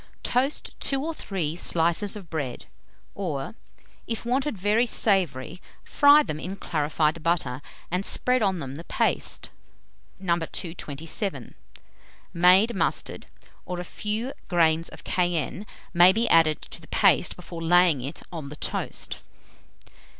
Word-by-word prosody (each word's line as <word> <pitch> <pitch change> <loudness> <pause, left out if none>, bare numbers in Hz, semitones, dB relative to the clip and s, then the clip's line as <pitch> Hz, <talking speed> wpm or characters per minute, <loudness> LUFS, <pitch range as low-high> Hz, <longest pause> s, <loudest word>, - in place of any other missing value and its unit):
Toast 260 +4 0
2 275 +1 -1
or 330 - -2
3 175 - -3
slices 170 +4 +2
of 200 -4 -9
bread, 145 -7 -4 0.5
or, 155 -7 -4 0.5
if 230 0 -4
wanted 260 0 0
very 210 +6 +2
savoury, 180 - 0 0.2
fry 290 +1 +6
them 155 - -5
in 185 +4 -5
clarified 155 -2 -1
butter, 155 -6 -1 0.3
and 180 +2 0
spread 250 +4 +1
on 195 -3 +1
them 135 -5 -6
the 160 +4 -8
paste, - - -1 0.7
No. 175 -2 0
227. 165 - -4 0.8
Made 185 +7 +5
mustard, - - -1 0.4
or 180 -1 -5
a - - -3
few 215 +8 -3
grains 165 -2 +2
of - - -12
cayenne, 175 +2 -1 0.3
may 175 +2 +7
be 225 +4 0
added 160 -2 +5
to - - -10
the 160 - -14
paste 185 -4 +3
before 170 -1 -9
laying 175 -4 +4
it 135 +4 -7
on 155 -4 -6
the 150 - -8
toast. - - -3
175 Hz, 135 wpm, -25 LUFS, 160-205 Hz, 0.8 s, may